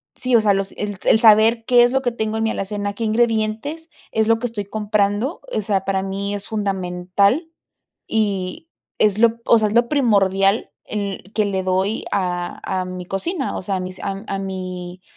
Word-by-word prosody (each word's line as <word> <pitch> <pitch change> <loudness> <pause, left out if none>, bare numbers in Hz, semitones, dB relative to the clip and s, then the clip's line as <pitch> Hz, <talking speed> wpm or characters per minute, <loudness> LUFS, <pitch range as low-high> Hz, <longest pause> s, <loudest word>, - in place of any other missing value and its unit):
sí, 255 -2 +1
o 225 - +6
sea, 205 -2 +3
los 195 0 -2
el 205 -2 -4
el 220 - +5
saber 225 0 +5
qué 245 -1 +6
es 245 - +3
lo 265 0 +1
que 245 - +1
tengo 220 -1 -2
en 225 - 0
mi 225 - +1
alacena, 205 +1 -3
qué 230 - -5
ingredientes 225 +8 0 0.2
es 220 0 +1
lo 225 0 +3
que 245 - -1
estoy 210 -3 -5
comprando, 210 - -1
o - - 0
sea, 195 -2 -1
para 190 -1 0
mí 200 +1 -3
es 200 - -6
fundamental 200 - 0 0.6
y 200 - -1 0.3
es 210 -1 +3
lo, 230 0 +3
o 230 - +6
sea, 215 - +2
es 210 - -4
lo 235 0 +4
primordial 200 -6 +2 0.2
en 200 -2 -4
que 215 - +2
le 190 -2 -1
doy 190 +3 0
a 180 -3 -2 0.2
a - - -4
mi 185 0 -6
cocina, 275 - -3
o - - -4
sea, 195 +1 -2
a - - -2
mis 185 0 -6
a 195 +1 -4
a 195 - -2
mi 185 -1 -6
205 Hz, 200 wpm, -21 LUFS, 195-225 Hz, 0.6 s, o